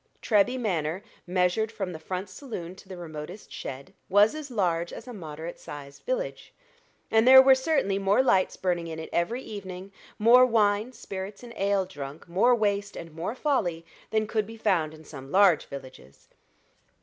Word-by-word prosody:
Treby 225 Hz, +4 st, +2 dB
Manor, 180 Hz, -4 st, -1 dB, 0.2 s
measured 180 Hz, +5 st, +1 dB
from 200 Hz, -5 st, -4 dB
the 160 Hz, -, -7 dB
front 185 Hz, +4 st, -4 dB
saloon 185 Hz, -5 st, -7 dB
to 190 Hz, -, -16 dB
the 185 Hz, -, -7 dB
remotest 170 Hz, +3 st, -8 dB
shed, 135 Hz, +1 st, -7 dB, 0.2 s
was 205 Hz, +5 st, +5 dB
as 305 Hz, -2 st, -7 dB
large 175 Hz, -7 st, 0 dB
as -, -, -9 dB
a 245 Hz, -, -7 dB
moderate 160 Hz, -3 st, -7 dB
sized 140 Hz, -1 st, -10 dB
village, -, -, -3 dB, 0.6 s
and 225 Hz, +2 st, +4 dB
there 265 Hz, 0 st, +11 dB
were 265 Hz, 0 st, +8 dB
certainly 260 Hz, -8 st, +1 dB
more 200 Hz, +6 st, +3 dB
lights 190 Hz, -7 st, +2 dB
burning 175 Hz, -2 st, -1 dB
in 160 Hz, -1 st, -6 dB
it 160 Hz, -, -7 dB
every 230 Hz, +10 st, 0 dB
evening, 190 Hz, -2 st, -8 dB, 0.3 s
more 235 Hz, +4 st, +7 dB
wine, 215 Hz, -1 st, +2 dB
spirits, 195 Hz, -2 st, -7 dB
and 235 Hz, -1 st, -10 dB
ale 195 Hz, -1 st, +1 dB
drunk, 145 Hz, -4 st, -9 dB
more 205 Hz, +9 st, +4 dB
waste 205 Hz, -2 st, -1 dB
and 165 Hz, -1 st, -8 dB
more 170 Hz, +8 st, -4 dB
folly, 190 Hz, -, 0 dB, 0.2 s
than 220 Hz, 0 st, +1 dB
could 215 Hz, -1 st, -1 dB
be 225 Hz, 0 st, -10 dB
found 160 Hz, -7 st, +1 dB
in 155 Hz, -, -15 dB
some 135 Hz, -3 st, -10 dB
large 190 Hz, -5 st, +5 dB
villages. 130 Hz, -, -11 dB
195 Hz, 175 wpm, -27 LUFS, 170-225 Hz, 0.6 s, there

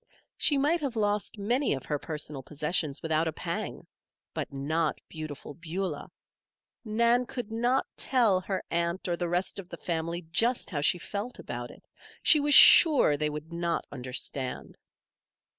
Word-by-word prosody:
She 290 Hz, -, +2 dB
might 305 Hz, +5 st, +2 dB
have 275 Hz, -5 st, -3 dB
lost 210 Hz, 0 st, -1 dB
many 240 Hz, -, +1 dB
of 135 Hz, -, -8 dB
her 150 Hz, -1 st, -2 dB
personal 150 Hz, -2 st, -5 dB
possessions 150 Hz, +1 st, -2 dB
without 160 Hz, 0 st, +1 dB
a -, -, 0 dB
pang; -, -, -5 dB, 0.5 s
but -, -, -4 dB
not 150 Hz, +3 st, -1 dB
Beautiful 155 Hz, -2 st, -8 dB
Beulah. 170 Hz, 0 st, -5 dB, 0.7 s
Nan 235 Hz, +2 st, +2 dB
could 240 Hz, -4 st, -6 dB
not 240 Hz, +4 st, +1 dB
tell 230 Hz, -8 st, +2 dB
her 190 Hz, 0 st, -3 dB
aunt 170 Hz, +2 st, -1 dB
or 175 Hz, -, 0 dB
the 175 Hz, 0 st, -3 dB
rest 180 Hz, +3 st, -1 dB
of 180 Hz, -2 st, -9 dB
the -, -, -8 dB
family 170 Hz, +1 st, -3 dB
just 235 Hz, +7 st, +1 dB
how 145 Hz, -4 st, -2 dB
she 150 Hz, -, +3 dB
felt 205 Hz, +7 st, -5 dB
about 120 Hz, 0 st, -6 dB
it. -, -, -16 dB, 0.4 s
She 305 Hz, -, +7 dB
was 290 Hz, 0 st, +4 dB
sure 295 Hz, -, +8 dB
they 150 Hz, +1 st, -1 dB
would 150 Hz, +2 st, -7 dB
not 170 Hz, 0 st, -1 dB
understand. 130 Hz, 0 st, -5 dB
175 Hz, 160 wpm, -28 LUFS, 150-230 Hz, 0.7 s, sure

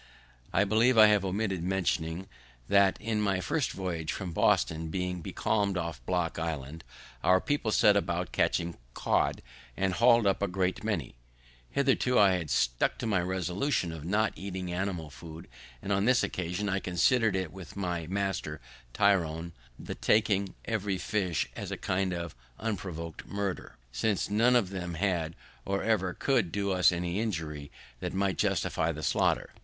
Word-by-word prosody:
I 100 Hz, -, +3 dB
believe 115 Hz, +4 st, +3 dB
I 110 Hz, -, +10 dB
have 105 Hz, -2 st, +3 dB
omitted 95 Hz, -1 st, -1 dB
mentioning 90 Hz, -1 st, -1 dB, 0.4 s
that, 100 Hz, -1 st, +4 dB
in 110 Hz, -1 st, -1 dB
my 100 Hz, -3 st, +1 dB
first 135 Hz, -, 0 dB
voyage 85 Hz, -4 st, -3 dB
from 95 Hz, -3 st, -4 dB
Boston, 80 Hz, 0 st, +2 dB
being 90 Hz, +1 st, -3 dB
becalm'd 100 Hz, +2 st, 0 dB
off 85 Hz, -8 st, -4 dB
Block 90 Hz, -3 st, 0 dB
Island, 80 Hz, -1 st, -4 dB, 0.4 s
our 95 Hz, 0 st, +5 dB
people 145 Hz, -2 st, -1 dB
set 105 Hz, -1 st, +5 dB
about 90 Hz, -2 st, -1 dB
catching 85 Hz, 0 st, 0 dB, 0.2 s
cod, -, -, +1 dB, 0.3 s
and 95 Hz, -1 st, +1 dB
hauled 115 Hz, +2 st, +5 dB
up 100 Hz, -1 st, +2 dB
a 100 Hz, -, +2 dB
great 95 Hz, +1 st, -1 dB
many. 95 Hz, -, -2 dB, 0.6 s
Hitherto 130 Hz, -2 st, +2 dB
I 100 Hz, -2 st, +6 dB
had 90 Hz, -4 st, -1 dB
stuck -, -, +1 dB
to -, -, -4 dB
my 100 Hz, -5 st, +2 dB
resolution 95 Hz, -, -1 dB
of 80 Hz, -2 st, -7 dB
not 105 Hz, +5 st, +1 dB
eating 95 Hz, -2 st, -5 dB
animal 90 Hz, -4 st, -3 dB
food, 80 Hz, +3 st, -10 dB, 0.4 s
and 100 Hz, -, 0 dB
on 100 Hz, +1 st, +1 dB
this 125 Hz, +1 st, +4 dB
occasion 90 Hz, +3 st, -2 dB
I 95 Hz, 0 st, 0 dB
consider'd, 95 Hz, 0 st, +1 dB
with 95 Hz, -4 st, -10 dB
my 90 Hz, -4 st, -3 dB
master 95 Hz, -5 st, -2 dB, 0.4 s
Tryon, 85 Hz, -5 st, +1 dB, 0.2 s
the -, -, -6 dB
taking 105 Hz, -3 st, +1 dB
every 105 Hz, -4 st, -1 dB
fish 90 Hz, -3 st, -1 dB
as -, -, -5 dB
a -, -, -3 dB
kind 95 Hz, 0 st, -1 dB
of 85 Hz, -2 st, -4 dB, 0.2 s
unprovoked 90 Hz, -7 st, -5 dB
murder, 100 Hz, -2 st, -4 dB
since 100 Hz, -, 0 dB
none 115 Hz, +4 st, +4 dB
of 105 Hz, -6 st, +2 dB
them 90 Hz, -3 st, -4 dB
had, 85 Hz, -3 st, -1 dB, 0.3 s
or 100 Hz, 0 st, -1 dB
ever 95 Hz, -5 st, +1 dB
could 120 Hz, -, +1 dB
do 100 Hz, -1 st, -1 dB
us 90 Hz, -1 st, +5 dB
any 90 Hz, +2 st, -2 dB
injury 80 Hz, -9 st, -3 dB, 0.3 s
that -, -, -4 dB
might 95 Hz, -1 st, 0 dB
justify 80 Hz, -, +1 dB
the 80 Hz, -1 st, -7 dB
slaughter. -, -, +1 dB
95 Hz, 160 wpm, -29 LUFS, 85-105 Hz, 0.6 s, I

